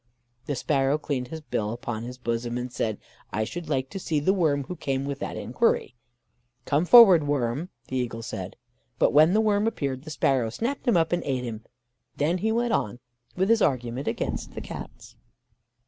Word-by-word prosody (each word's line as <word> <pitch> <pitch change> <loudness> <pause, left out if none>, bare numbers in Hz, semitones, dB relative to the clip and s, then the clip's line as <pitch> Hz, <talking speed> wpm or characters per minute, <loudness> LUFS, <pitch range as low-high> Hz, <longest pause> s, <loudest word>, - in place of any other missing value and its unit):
"The 145 - -1
sparrow 135 +2 +1
cleaned 140 -5 -3
his 160 +4 -7
bill 110 -8 -2
upon 120 -2 -4
his 125 +2 -7
bosom, 120 0 -2
and 125 0 -5
said: 110 -3 -1 0.3
'I 110 - 0
should 170 +9 -6
like 130 0 0
to 195 - -5
see 160 -4 0
the 185 +7 +2
worm 155 -7 +1
who 180 - -6
came 135 -4 -2
with 140 0 -4
that - - -4
enquiry.' - - 0 0.7
"'Come 150 +4 +1
forward, 185 -9 +8
worm,' 140 +4 -1 0.2
the 130 - -3
eagle 115 -2 -3
said. 95 -4 -6 0.4
But - - +3
when 155 +4 +6
the 220 - +4
worm 210 0 +2
appeared, 135 - -2
the 155 - -9
sparrow 135 -6 +1
snapped 245 - -3
him 230 -7 +4
up, 165 -1 +2
and 175 0 +1
ate 130 -3 -1
him. 115 -2 -6 0.5
Then 165 +5 +1
he 220 +4 0
went 235 +1 +1
on 105 - -1 0.4
with 190 +1 +1
his 230 -1 +4
argument 125 -1 0
against - - -3
the - - -5
Cats." - - -9
140 Hz, 195 wpm, -26 LUFS, 125-175 Hz, 0.7 s, forward